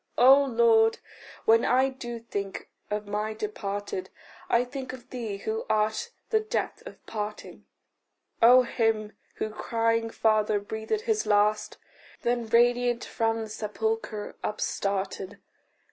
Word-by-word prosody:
O 270 +3 +7
Lord, 230 -3 +4 0.5
when 225 +1 +5
I 260 +2 +3
do 240 -3 -7
think 200 -4 -5 0.2
of 210 0 -2
my 210 +1 -2
departed, 225 - -4 0.4
I 235 - +4
think 260 0 -6
of 255 -2 -12
thee 225 -6 -4
who 440 - -3
art 215 - +1 0.2
the 440 - +4
death 435 0 -3
of - - -13
parting; 210 -1 -6 0.7
Of 250 +2 +8
him 225 -3 0 0.2
who 215 - -3
crying 230 +1 0
Father 215 -2 +2
breathed 220 - -3
his 440 -2 0
last, 210 +1 +2 0.5
Then 240 -1 0
radiant 240 +1 +3
from 225 -1 -1
the 220 - -8
sepulchre 215 0 -3
upstarted. 195 -2 -2
225 Hz, 125 wpm, -27 LUFS, 210-245 Hz, 0.7 s, Of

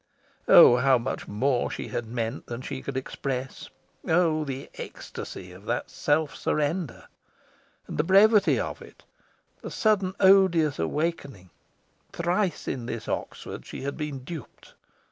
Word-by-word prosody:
Oh, 120 - +9
how 130 0 +4
much 120 +2 -4
more 125 +4 0
she - - -6
had 120 - -4
meant 115 -1 -4
than 120 +1 -6
she 130 -1 -5
could 135 -1 -5
express! 130 0 -4 0.4
Oh, 160 -2 +2
the 135 -1 -6
ecstasy 90 - -8
of 95 +3 -14
that 120 - -2
self 150 0 0
surrender! 155 0 -2 0.8
And - - -7
the - - +4
brevity 200 +3 +5
of - - -4
it! - - -15 0.6
the - - -6
sudden 195 -4 +1
odious 190 - +5
awakening! 135 - -3 0.6
Thrice 175 +1 -1
in 120 -3 -3
this 115 -3 -5
Oxford - - -5
she - - -8
had 140 +1 -3
been 150 -4 -5
duped. 155 -1 -10
140 Hz, 140 wpm, -26 LUFS, 125-170 Hz, 0.8 s, Oh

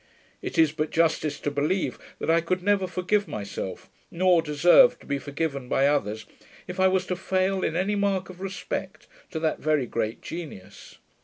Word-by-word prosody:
It - - -5
is 160 -2 +5
but 155 0 -2
justice 160 -2 +1
to 145 - -1
believe, 150 +6 -1 0.2
that - - 0
I 165 +1 +4
could 180 +2 -2
never 200 -1 +2
forgive 200 +3 0
myself, 100 -2 -6 0.2
nor 180 -1 +3
deserve 175 - +5
to - - -18
be 140 -1 -2
forgiven 140 -2 -3
by 135 - +3
others, 110 -7 0 0.4
if 180 +1 -7
I 190 - +5
was 185 0 +1
to 180 - -2
foil 190 +1 0
in 160 - -1
any 190 +4 +1
mark 200 -2 0
of 185 0 -12
respect 190 0 -5 0.2
to 160 - -4
that 160 -1 0
very 155 -4 +1
great 110 -1 -3
genius. 160 - -9
170 Hz, 180 wpm, -26 LUFS, 145-185 Hz, 0.4 s, is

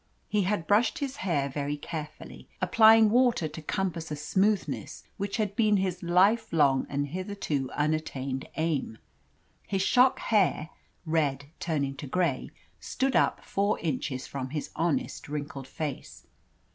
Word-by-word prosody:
He 210 - +1
had 190 -4 -1
brushed 210 +5 +3
his 280 -1 -4
hair 155 -7 0
very 145 +1 -3
carefully, 155 0 -8
applying 220 -1 +6
water 240 -8 +3
to 155 +1 -8
compass 170 0 -2
a 150 - -3
smoothness 195 +7 -1
which 200 -1 -3
had 210 -3 -1
been 215 -3 +3
his 185 -2 -1
life 195 +6 +3
long 140 -5 +3
and 145 0 -2
hitherto 180 -6 -3
unattained 145 -3 -2
aim. 155 -8 -1 0.7
His 195 -1 0
shock 255 +4 +4
hair 190 -7 +1 0.3
red 145 -3 0
turning 140 -5 -1
to 145 - -7
grey 160 -3 0 0.3
stood 265 -1 -1
up - - +2
four 200 +2 0
inches 140 -4 -3
from 130 -2 -5
his 150 +1 -4
honest, 175 - -1
wrinkled 145 -2 -5
face. 150 -2 -6
165 Hz, 140 wpm, -28 LUFS, 145-205 Hz, 0.7 s, applying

